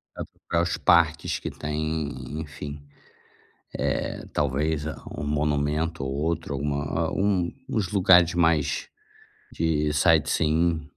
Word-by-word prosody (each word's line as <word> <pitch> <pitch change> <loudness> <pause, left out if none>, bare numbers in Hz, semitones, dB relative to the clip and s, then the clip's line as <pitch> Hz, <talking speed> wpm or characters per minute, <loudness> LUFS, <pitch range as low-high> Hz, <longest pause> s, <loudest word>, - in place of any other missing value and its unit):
vai - - -5
procurar 85 0 -2
os 85 - -1
parques 85 -1 +3
que - - -4
tem, 75 0 -4
enfim. 75 -1 -7 1.0
Eh, - - -2
talvez 75 +2 0 0.3
um 70 - -3
monumento 75 +1 0
ou 65 - -3
outro, 80 +1 -2
alguma 70 +3 -1
um 95 -3 +1 0.2
uns 110 -8 -1
lugares 90 -4 +5
mais 80 -4 +1 0.7
de 75 -2 0
sightseeing. 80 +1 +2
80 Hz, 110 wpm, -25 LUFS, 75-85 Hz, 1.0 s, lugares